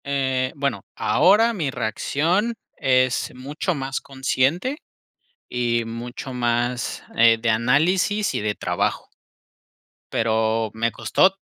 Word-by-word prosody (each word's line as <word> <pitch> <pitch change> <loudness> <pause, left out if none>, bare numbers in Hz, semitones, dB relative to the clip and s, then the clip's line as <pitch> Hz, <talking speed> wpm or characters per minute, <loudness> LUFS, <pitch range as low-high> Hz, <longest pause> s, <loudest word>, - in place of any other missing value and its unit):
Eh, 130 -2 0
bueno, 140 -1 -1
ahora 210 - +4
mi 165 -10 -2
reacción 165 - 0 0.2
es 130 -1 +2
mucho 145 +7 -3
más 135 -1 -3
consciente 135 - 0 0.7
y 120 -1 0
mucho 120 +3 -6
más, 120 0 -1
eh, 115 0 +6
de 120 - -1
análisis 160 - +2
y - - -1
de 105 0 -1
trabajo. - - -2 1.0
Pero 110 0 +1
me 115 +1 0
costó 190 - +2
130 Hz, 110 wpm, -23 LUFS, 115-160 Hz, 1.0 s, eh